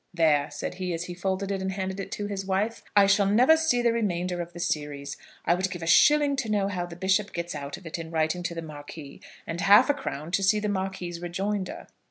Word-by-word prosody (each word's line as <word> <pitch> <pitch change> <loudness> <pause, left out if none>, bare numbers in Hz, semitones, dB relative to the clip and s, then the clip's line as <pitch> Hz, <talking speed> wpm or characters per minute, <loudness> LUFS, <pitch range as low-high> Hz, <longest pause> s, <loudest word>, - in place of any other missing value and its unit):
"There," 155 -4 +3
said - - -5
he, 180 -2 -3
as 165 - -4
he 180 - -6
folded 190 +2 -2
it, 195 -1 -2
and 190 0 -2
handed 190 0 -4
it 195 - -6
to 205 - -3
his 200 -1 -4
wife, 195 +4 -1
"I 200 -1 +7
shall 200 0 +4
never 245 +10 +6
see 320 -7 +1
the 235 -1 +3
remainder 180 -5 -1
of 170 0 -7
the 175 - -10
series. 145 -4 -3 0.3
I 170 - +4
would 185 +2 0
give 175 -3 -6
a - - -3
shilling 290 - +5
to 235 -4 -2
know 200 -2 +1
how 180 -3 -3
the 170 - -9
bishop 190 +3 +1
gets 170 0 -4
out 145 -1 -6
of 190 - -16
it 165 +1 -5
in 165 -1 -6
writing 160 +2 0
to 175 -1 -4
the 165 - -5
Marquis, 145 -1 -10 0.2
and 170 +2 -4
half 205 +8 +6
a - - 0
crown 170 - -5
to 185 - +1
see 210 +2 +3
the 210 0 -2
Marquis's 190 -3 -3
rejoinder." 190 +2 -3
190 Hz, 250 wpm, -27 LUFS, 170-205 Hz, 0.3 s, I